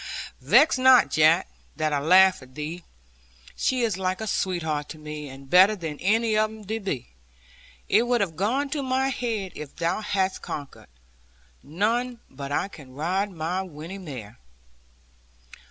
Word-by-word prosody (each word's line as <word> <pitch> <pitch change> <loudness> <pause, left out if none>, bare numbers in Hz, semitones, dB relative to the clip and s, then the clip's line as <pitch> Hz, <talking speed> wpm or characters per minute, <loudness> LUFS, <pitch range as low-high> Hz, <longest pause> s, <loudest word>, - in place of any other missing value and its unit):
Vex 300 - +5
not, 260 -1 +6
Jack, 160 +3 +4 0.3
that 155 -1 -1
I 145 - +1
laugh 185 +5 +5
at 130 0 -16
thee. 160 +4 -5 0.7
She 255 -2 0
is 215 -5 0
like 185 0 -1
a 220 - -4
sweetheart 160 -7 -2
to 160 - -8
me, 150 -1 -7
and 135 +1 -12
better, 190 +7 +6
than 160 -6 -6
any 220 +3 +2
of 215 0 +2
them 220 0 -11 0.2
be. 150 - -4 0.8
It 225 +5 +3
would 245 -1 +2
have 180 -7 -1
gone 255 - 0
to 300 - -1
my 265 0 0
heart 220 -7 -3
if 150 -2 -8
thou 170 +4 -1
hadst 195 -2 -1
conquered. 145 -2 -7 0.7
None 230 - -1
but 140 +1 -7
I 145 - 0
can 140 -9 -14
ride 185 +7 -1
my 175 +1 -3
Winnie 175 +1 -8
mare.' 125 - -9
185 Hz, 155 wpm, -25 LUFS, 150-215 Hz, 0.8 s, not